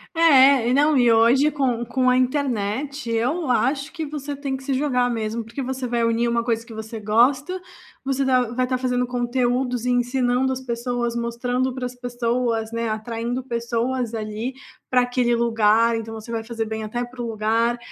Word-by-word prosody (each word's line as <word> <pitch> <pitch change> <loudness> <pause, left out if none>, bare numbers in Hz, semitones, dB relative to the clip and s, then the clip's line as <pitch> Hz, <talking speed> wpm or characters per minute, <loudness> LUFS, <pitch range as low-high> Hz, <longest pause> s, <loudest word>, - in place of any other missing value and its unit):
É 275 -6 +6
e 250 - +2
não 295 +2 +4
e 240 -1 +5
hoje 235 +6 +5
com 250 -5 -1
com 255 0 +2
a 250 - +3
internet 255 0 -1
eu 255 +7 0
acho 275 +4 +1
que 320 -1 -5
você 290 -1 -5
tem 275 -1 -3
que - - -13
se 270 0 -1
jogar 255 -3 +1
mesmo. 225 0 -2
Porque 230 +5 -6
você 260 0 -3
vai 235 -1 0
unir 230 +1 +1
uma 235 0 0
coisa 230 -1 -1
que 230 - -10
você 220 +1 -7
gosta, 260 - +2 0.5
você 270 0 0
tá 255 -1 +4
vai 255 +1 0
tá 255 0 0
fazendo 250 -1 0
conteúdos 245 0 -1
e - - +2
ensinando 245 +1 +1
as 260 - -4
pessoas, 240 -1 -2
mostrando 245 +2 -1
pra 255 -1 -3
as 250 - -7
pessoas, 240 -2 -1
né, 230 -1 -2
atraindo 230 +3 -3
pessoas 235 0 -2
ali 220 +3 -4 0.4
pra 255 - +4
aquele 245 -1 +1
lugar. 230 0 +3
Então 225 0 -5
você 220 +1 -8
vai 225 -1 -3
fazer 230 -1 -3
bem 220 0 -4
até 240 +3 -3
para 245 0 -8
o - - -3
lugar, 225 +2 0
245 Hz, 190 wpm, -22 LUFS, 230-260 Hz, 0.5 s, É